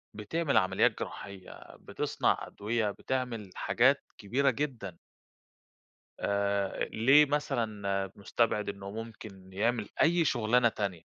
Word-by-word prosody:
بتعمل 140 +8 0
عمليات 95 - +3
جراحية، 95 -2 -8
بتصنع - - 0
أدوية، 110 0 -1
بتعمل 120 -3 -3
حاجات 135 +4 +3
كبيرة 130 +7 +1
جدًا. 120 - -3 1.2
آآ، 100 -1 0
أ - - +1
ليه 135 +7 +5
مثلًا 105 -9 -1
مستبعِد 105 +1 0
إنه 100 0 -7
ممكن 105 -4 -9
يعمل 110 +2 0
أي 170 +1 +4
شغلانة 120 -1 +3
تانية؟ 100 -6 -3
110 Hz, 110 wpm, -30 LUFS, 100-125 Hz, 1.2 s, ليه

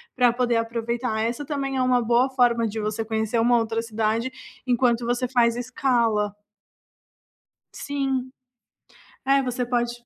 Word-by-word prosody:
pra 245 -2 +4
poder 240 -1 +1
aproveitar, 230 0 -2
essa 235 +5 -2
também 275 -2 -3
é - - +1
uma 255 -1 +3
boa 240 +3 +2
forma 240 -3 +2
de 220 +1 -4
você 215 +1 -2
conhecer 220 +1 -1
uma 240 +1 +4
outra 225 0 -1
cidade, 225 +2 -1 0.4
enquanto 240 -1 +2
você 245 +1 0
faz 235 -2 +2
escala. 235 -5 0 1.4
Sim. 270 -2 -2 1.0
É, 275 0 +4
você 250 -1 -2
pode 240 -1 0
240 Hz, 135 wpm, -24 LUFS, 230-255 Hz, 1.4 s, pra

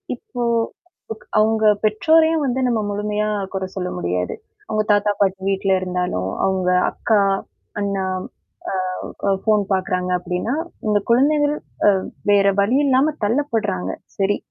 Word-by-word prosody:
இப்போ 245 0 -6 0.8
க் - - -20
அவுங்க 220 0 +2 0.2
பெற்றோரையும் 315 +9 +3
வந்து 260 0 0
நம்ம 235 -2 +1
முழுமையா 210 +1 -1 0.2
குற 190 - -2
சொல்ல 180 -2 -2
முடியாது. 90 +1 -2 0.3
அவுங்க 215 0 0
தாத்தா, 205 0 +3
பாட்டி 195 -1 +1
வீட்ல 195 0 0
இருந்தாலும், 180 - -2 0.2
அவுங்க 190 -1 +1 0.2
அக்கா, 215 -3 +1 0.6
அண்ணா, 200 -2 -1 0.7
அ - - -3 0.5
அ - - +4
ஃபோன் 215 -2 +2
பார்க்குறாங்க 185 -1 -1
அப்பிடின்னா, 180 +7 -3 0.3
இந்த 210 -1 +3
குழந்தைகள் 290 +4 +3 0.3
அ - - +9 0.4
வேற 200 -1 +5
வழி 235 +7 +2
இல்லாம 275 +3 +3
தள்ளப்படுறாங்க. 225 - 0 0.3
சரி, 200 +1 +1
205 Hz, 130 wpm, -21 LUFS, 190-240 Hz, 0.8 s, அ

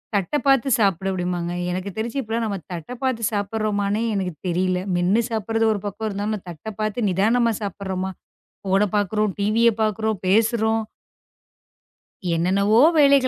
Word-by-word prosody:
தட்டப் 200 +11 0
பாத்துச் 270 -2 +4
சாப்புடு 195 -3 +1
அப்படிம்பாங்க. 175 -2 -2 0.2
எனக்குத் 185 +1 -4
தெரிஞ்சு 230 +4 -3
இப்பலாம் 225 0 -2
நாம 200 -2 -2
தட்டப் 180 - -7
பாத்து 255 -4 -1
சாப்பிடுறோமானே 205 0 -1
எனக்குத் 185 -6 -3
தெரியல. 180 +1 +1 0.2
மென்னு 185 +6 +2
சாப்பிடுறது 225 0 0
ஒரு 205 - -3
பக்கம் 210 +2 -3
இருந்தாலும் 205 0 -3
தட்டப் 175 +5 -8
பாத்து 215 +2 -1
நிதானமா 230 +6 +2
சாப்பிடுறோமா? 190 -1 -3 0.5
ஃபோன 195 +2 +3
பாக்குறோம். 210 +1 +1
டிவிய 220 +3 +3
பாக்குறோம், 220 -1 0
பேசுறோம். 220 +2 +2 1.5
என்னென்னவோ 200 +6 +3 0.2
வேலைகள் 280 -2 +5
210 Hz, 130 wpm, -22 LUFS, 190-225 Hz, 1.5 s, வேலைகள்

